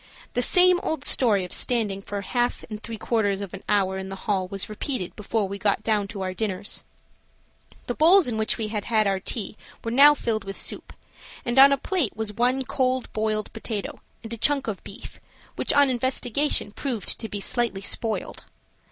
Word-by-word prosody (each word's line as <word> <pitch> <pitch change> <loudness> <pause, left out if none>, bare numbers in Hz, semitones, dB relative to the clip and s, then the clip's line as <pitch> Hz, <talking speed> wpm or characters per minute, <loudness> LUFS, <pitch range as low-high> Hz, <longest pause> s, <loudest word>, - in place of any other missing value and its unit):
The 245 - +1
same 360 +6 +6
old 315 -5 -2
story 215 -7 +3
of 180 - -6
standing 215 -5 +2
for 205 +1 -6
a 200 - -5
half 245 +2 -1
and 210 0 -6
three 225 -1 -6
quarters 205 -3 0
of 200 -2 -7
an 195 - -7
hour 190 -2 +1
in 190 0 -6
the 195 - -5
hall 195 -4 0
was 195 +1 -4
repeated 215 -2 -4
before 210 0 -2
we 200 +1 -6
got 205 +1 0
down 210 -3 +1
to 200 -2 -6
our 185 0 -3
dinners. 200 0 -2 1.0
The 245 - -2
bowls 340 +5 +6
in 240 - -2
which 220 0 -1
we 220 -2 -3
had 210 -2 -3
had 220 -2 +2
our 195 -1 +1
tea 210 +2 -4 0.3
were 230 - -3
now 285 +4 +7
filled 225 -5 -2
with 195 0 -7
soup, - - -4 0.5
and 240 +2 +2
on 275 +1 +9
a 280 - +3
plate 320 - -2
was 220 -1 -2
one 250 +4 +1
cold 255 0 -1
boiled 215 -1 -2
potato 220 -2 -5 0.2
and 225 0 -5
a - - -5
chunk 280 +3 +1
of 205 -4 -4
beef, - - -10 0.4
which - - 0
on 285 0 +5
investigation, 255 0 0
proved 235 -2 -1
to 225 - -4
be 205 - -4
slightly 220 -1 0
spoiled. 220 +2 -2
220 Hz, 200 wpm, -24 LUFS, 200-250 Hz, 1.0 s, on